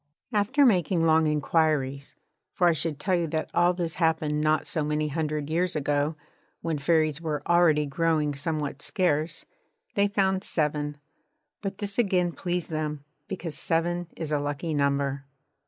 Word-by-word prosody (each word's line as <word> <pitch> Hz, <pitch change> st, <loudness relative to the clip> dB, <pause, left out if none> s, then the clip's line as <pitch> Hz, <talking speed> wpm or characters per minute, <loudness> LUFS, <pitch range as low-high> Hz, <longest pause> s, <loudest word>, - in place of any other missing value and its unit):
After 220 Hz, +8 st, +3 dB
making 180 Hz, -, +3 dB
long 160 Hz, 0 st, +4 dB
inquiries 150 Hz, -2 st, 0 dB, 0.4 s
for 175 Hz, -, +3 dB
I 170 Hz, -, +5 dB
should 155 Hz, -1 st, -2 dB
tell 190 Hz, +3 st, 0 dB
you 170 Hz, -2 st, +1 dB
that 155 Hz, 0 st, -3 dB
all 175 Hz, +1 st, +4 dB
this 175 Hz, -3 st, -3 dB
happened 160 Hz, -2 st, +1 dB
not 155 Hz, 0 st, +2 dB
so 155 Hz, -, -1 dB
many 150 Hz, 0 st, 0 dB
hundred 150 Hz, -1 st, -2 dB
years 170 Hz, +3 st, 0 dB
ago, 145 Hz, +1 st, 0 dB, 0.5 s
when 160 Hz, -3 st, -2 dB
Fairies 155 Hz, 0 st, +2 dB
were 150 Hz, -3 st, -3 dB
already 170 Hz, -4 st, +4 dB
growing 150 Hz, 0 st, +1 dB
somewhat 145 Hz, -1 st, -3 dB
scarce 160 Hz, -4 st, 0 dB, 0.5 s
they 200 Hz, 0 st, +3 dB
found 190 Hz, -1 st, +1 dB
seven. 150 Hz, -3 st, -1 dB, 0.6 s
But 195 Hz, -2 st, -4 dB
this 200 Hz, +2 st, -3 dB
again 185 Hz, -6 st, +2 dB
pleased 175 Hz, 0 st, -3 dB
them, 150 Hz, -2 st, -3 dB, 0.2 s
because 175 Hz, -4 st, -5 dB
seven 175 Hz, +2 st, 0 dB
is 155 Hz, -2 st, -4 dB
a 150 Hz, -, +2 dB
lucky 145 Hz, +3 st, -3 dB
number. 140 Hz, -1 st, 0 dB
160 Hz, 155 wpm, -27 LUFS, 150-175 Hz, 0.6 s, I